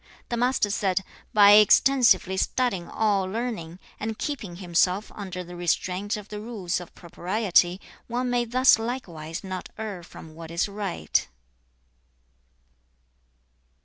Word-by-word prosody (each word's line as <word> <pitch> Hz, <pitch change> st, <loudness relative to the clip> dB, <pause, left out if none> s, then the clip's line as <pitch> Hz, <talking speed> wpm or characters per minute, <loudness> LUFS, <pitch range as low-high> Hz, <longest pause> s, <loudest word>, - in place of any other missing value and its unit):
The 235 Hz, -, -1 dB
Master 245 Hz, -4 st, +1 dB
said, 195 Hz, -2 st, 0 dB, 0.3 s
'By 205 Hz, -1 st, +7 dB
extensively 215 Hz, -2 st, +5 dB
studying 195 Hz, -3 st, -1 dB
all 205 Hz, -3 st, +1 dB
learning, 190 Hz, -5 st, -4 dB, 0.2 s
and 220 Hz, 0 st, -4 dB
keeping 230 Hz, -12 st, -4 dB
himself 180 Hz, +2 st, 0 dB
under 185 Hz, -3 st, -6 dB
the 175 Hz, 0 st, -10 dB
restraint 180 Hz, +4 st, -1 dB
of 210 Hz, -1 st, -10 dB
the 210 Hz, -, -6 dB
rules 205 Hz, -6 st, -3 dB
of 175 Hz, -, -12 dB
propriety, 180 Hz, 0 st, +1 dB, 0.3 s
one 245 Hz, +2 st, -2 dB
may 240 Hz, -1 st, +1 dB
thus 250 Hz, 0 st, +5 dB
likewise 175 Hz, -10 st, -5 dB
not 185 Hz, -1 st, -6 dB
err 210 Hz, -5 st, -5 dB
from 160 Hz, -2 st, -12 dB
what 165 Hz, 0 st, -10 dB
is 170 Hz, +4 st, 0 dB
right.' 200 Hz, -, -2 dB
200 Hz, 125 wpm, -25 LUFS, 175-225 Hz, 0.3 s, By